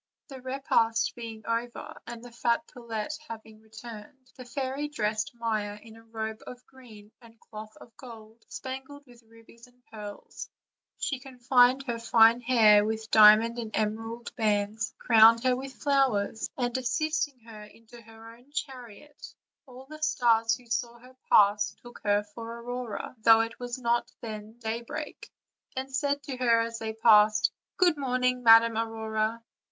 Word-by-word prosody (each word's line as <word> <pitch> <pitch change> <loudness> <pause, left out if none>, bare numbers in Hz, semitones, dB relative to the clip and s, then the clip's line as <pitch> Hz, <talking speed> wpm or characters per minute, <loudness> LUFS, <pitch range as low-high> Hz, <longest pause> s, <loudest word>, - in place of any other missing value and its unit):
The 265 -2 -10
repast 260 -4 0
being 225 -2 -9
over, 230 +1 -4
and 235 0 -8
the 245 - -11
fat 235 +5 0
pullet 235 0 -6 0.2
having 220 -1 -10
re 220 - -24
turned, 230 +3 -12
the 255 - -11
fairy 270 +3 -3
dressed 215 -5 -2
Maia 215 -3 -3
in 225 +1 -15
a 225 - -15
robe 220 -1 -6
of 250 0 -11
green 220 -6 -16
and 230 -1 -18
cloth 215 0 -11
of 230 - -16
gold, 225 -3 -13
spangled 265 +2 -8
with 245 -2 -18
rubies 230 +1 -19
and 250 0 -29
pearls; 210 -2 -10 0.5
she 270 - -3
confined 255 0 +2
her 240 -3 -4
fair 230 0 +5
hair 225 -4 +5
with 220 +1 -4
diamond 220 +2 +6
and 220 -2 -5
emerald 225 +2 -4
bands, 210 -1 -1
crowned 230 0 +6
her 255 -1 +3
with 265 +1 -7
flowers, 265 -8 0
and 245 -2 -2
assisting 305 +2 -1
her 225 -2 -12
into 230 +2 -17
her 225 +1 -14
own 245 +4 -23
chariot, 270 -1 -8 0.3
all 255 +1 -13
the 310 +2 -12
stars 230 -6 +2
who 250 - -16
saw 235 +1 -3
her 255 +2 -18
pass 205 0 +4
took 240 0 -12
her 205 0 +2
for 230 +3 -9
Aurora, 245 -2 -6
though 225 0 +6
it 225 0 -5
was 245 0 -5
not 235 -1 -1
then 215 -1 -8
daybreak, 230 0 -6 0.5
and 265 +1 -5
said 285 +1 -1
to 270 -3 -6
her 235 -2 +3
as 230 0 -4
they 220 -1 -4
passed: 215 -1 +4 0.3
"Good 350 -4 +3
morning, 250 -2 0
Madam 230 -1 +6
Aurora." 220 0 -2
230 Hz, 160 wpm, -28 LUFS, 220-250 Hz, 0.5 s, diamond